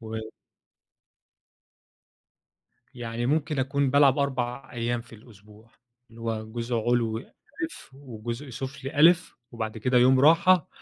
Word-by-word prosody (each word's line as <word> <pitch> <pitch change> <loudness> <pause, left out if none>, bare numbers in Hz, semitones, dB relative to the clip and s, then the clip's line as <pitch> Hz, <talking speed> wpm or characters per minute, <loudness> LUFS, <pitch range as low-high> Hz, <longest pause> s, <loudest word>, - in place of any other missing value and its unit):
و 110 - -10 2.9
يعني 120 0 -4
ممكن 150 0 0
أكون 135 +1 0
بالعب 140 0 +5
4 135 -1 -2
أيام 120 0 -2
في 115 0 -15
الأسبوع، 105 0 -18 0.4
اللي 115 +1 -14
هو 110 -1 -3
جزء 120 0 -3
علوي 115 0 0
أ، - - -27 0.6
وجزء 120 0 -7
سفلي 135 +5 +3
أ، - - +4 0.4
وبعد 110 -1 -4
كده 125 +3 +2
يوم 130 +1 +5
راحة 165 +4 +5
120 Hz, 115 wpm, -26 LUFS, 115-140 Hz, 2.9 s, بالعب